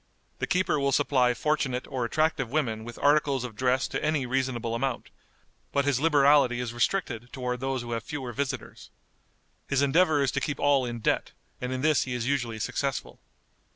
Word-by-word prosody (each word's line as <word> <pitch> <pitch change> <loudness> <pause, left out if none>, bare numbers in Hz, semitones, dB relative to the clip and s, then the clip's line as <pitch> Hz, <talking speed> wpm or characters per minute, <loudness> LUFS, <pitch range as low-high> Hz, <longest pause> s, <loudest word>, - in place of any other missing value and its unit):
The - - -1
keeper 180 -4 +1
will 140 0 +1
supply 130 -3 +3
fortunate 135 -4 -1
or 130 -3 -2
attractive 155 -1 0
women 115 -6 -1
with 120 +1 -9
articles 145 -3 +2
of 120 -4 -6
dress 130 +2 +1
to - - -3
any 155 -3 +1
reasonable 125 -3 -1
amount, 130 +1 -2 0.6
but 140 -1 +1
his 140 -3 +2
liberality 140 -4 +4
is 120 -1 -3
restricted 120 - -1
toward 125 -2 -3
those 135 -1 -2
who 120 - -7
have 115 -1 -2
fewer 130 -5 -5
visitors. 140 +3 -4 0.8
His 140 0 +1
endeavor 150 0 +3
is 135 - +1
to - - -2
keep 145 - -2
all 140 -2 +3
in 120 -1 -5
debt, - - 0 0.3
and 125 0 -3
in 130 0 -2
this 155 0 +3
he 125 -1 -3
is 120 -2 -2
usually 120 -4 -1
successful. 135 +5 -3
130 Hz, 185 wpm, -27 LUFS, 125-145 Hz, 0.8 s, liberality